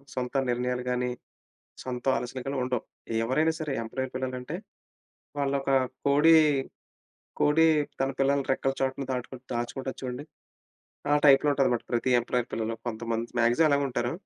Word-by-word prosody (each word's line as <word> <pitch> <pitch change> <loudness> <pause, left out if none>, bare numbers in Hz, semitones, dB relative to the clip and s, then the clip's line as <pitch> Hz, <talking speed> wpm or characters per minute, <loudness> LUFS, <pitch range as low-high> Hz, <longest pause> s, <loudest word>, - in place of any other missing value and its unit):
సొంత 125 +1 -3 0.2
నిర్ణయాలు 125 +1 -1
గాని, 125 0 0 0.8
సొంత 125 -1 -5
ఆలోచనలు 125 +1 -5
గాని 140 0 -2
ఉండవు. 125 -2 -2 0.4
ఎవరైనా 155 +7 +2
సరే, 150 -2 -2
ఎంప్లాయీ 130 +3 -4
పిల్లలంటే 130 +3 -4 0.8
వాళ్ళు 140 -1 0
ఒక 135 - -2 0.4
కోడి, 150 +4 +6 1.0
కోడి 150 +2 +4 0.4
తన 135 0 +1
పిల్లలని 140 0 +2
రెక్కల 135 0 0
చాటున 135 +1 -1
దాటు 125 +1 -4 0.2
దాచుకుంటాది 125 +3 -4
చూడండి. 125 +2 -4 0.9
ఆ - - +6
టైప్‌లో 140 +1 +6
ఉంటాదనమాట. 135 -4 +1
ప్రతి 120 +2 +1
ఎంప్లాయీ 120 0 -1
పిల్లలు, 115 0 -2
కొంతమంది. 115 0 -3
మాక్సిమమ్ 120 +7 +4
అలాగే 140 0 +2
ఉంటారు... 120 -1 -1
130 Hz, 135 wpm, -28 LUFS, 120-140 Hz, 1.0 s, కోడి